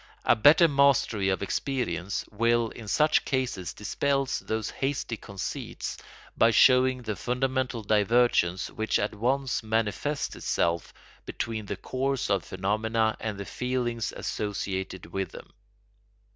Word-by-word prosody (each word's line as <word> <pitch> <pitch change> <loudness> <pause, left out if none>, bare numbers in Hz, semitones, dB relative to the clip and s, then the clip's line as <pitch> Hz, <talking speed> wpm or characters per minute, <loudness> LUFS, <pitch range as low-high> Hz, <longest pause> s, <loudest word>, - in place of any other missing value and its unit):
A - - +5
better 150 +9 +7
mastery 140 -8 +3
of 95 +1 0
experience 115 -5 -2
will 115 +1 +2
in 110 -1 -10
such 150 +9 +3
cases 120 -10 -2
dispel 135 +6 -1
those 110 0 -3
hasty 135 -3 -2
conceits 100 -3 -5 0.4
by 115 - +5
showing 130 +1 +5
the 110 -2 -3
fundamental 125 0 -1
divergence 105 -3 +2
which 110 0 0
at 105 - -1
once 130 +5 0
manifests 115 +6 -1
itself 85 0 -1 0.4
between 110 -3 -4
the - - -4
course 135 0 -2
of 95 -3 +2
phenomena 110 +4 0
and 105 -3 -4
the 100 - -5
feelings 120 -2 -2
associated 95 -3 -4
with 95 +2 -3
them. - - -11
115 Hz, 125 wpm, -27 LUFS, 100-130 Hz, 0.4 s, better